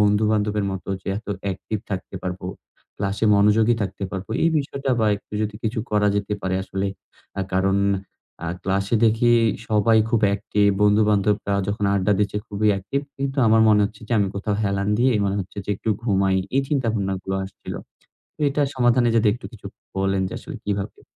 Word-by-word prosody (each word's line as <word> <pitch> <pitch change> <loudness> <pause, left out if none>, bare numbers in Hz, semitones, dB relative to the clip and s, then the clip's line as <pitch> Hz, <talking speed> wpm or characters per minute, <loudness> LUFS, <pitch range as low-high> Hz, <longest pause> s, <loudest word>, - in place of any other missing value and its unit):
বন্ধু-বান্ধবের 105 0 +2
মতো 95 0 -7
যে - - -7
এত 115 - -15 0.2
অ্যাকটিভ 100 +2 -3
থাকতে 95 0 -5
পারবো, 90 0 -4 0.5
ক্লাসে 100 +2 -1
মনোযোগী 105 +3 +4
থাকতে 100 0 -4
পারবো। 95 +2 -6
এই 165 - +5
বিষয়টা 140 -1 -3
বা 110 - +3
একটু 100 - -19
যদি 105 0 -3
কিছু 110 +1 -2
করা 105 -1 +3
যেতে 100 +1 -2
পারে 95 0 0
আসলে, 95 +1 -3 0.5
আ - - +1
কারণ 95 +1 +2 0.7
আ - - -3 0.2
ক্লাসে 100 +3 0
দেখি 115 +2 +3 0.4
সবাই 110 +1 +4
খুব 115 -2 +2
অ্যাকটিভ। 100 +1 +1 0.2
বন্ধু-বান্ধবরা 105 -1 +3
যখন 100 0 -1
আড্ডা 100 +1 +2
দিচ্ছে 105 0 0
খুবই 105 +1 +1
অ্যাকটিভ। 100 +8 -2 0.2
কিন্তু 135 0 -3
আমার 110 0 +5
মনে 105 -1 +5
হচ্ছে 105 +1 -6
যে - - -2
আমি 100 -1 +2
কোথাও 100 +1 -1
হেলান 100 0 0
দিয়ে 130 +1 +4
মনে 100 0 0
হচ্ছে 95 +2 -8
যে - - -4
একটু 110 - -2
ঘুমাই। 95 -4 +2 0.2
এই 135 - +4
চিন্তাভাবনাগুলো 100 -8 -1
আসছিল। 95 - -8 0.6
তো - - -42
এটার 145 0 +1
সমাধানে 120 -1 +3
যদি 110 -1 +3
একটু 120 - -9
কিছু 105 - -14 0.3
বলেন 95 0 +1
যে - - -8
আসলে - - -8
কিভাবে? 100 -1 -3
105 Hz, 175 wpm, -23 LUFS, 100-110 Hz, 0.7 s, এই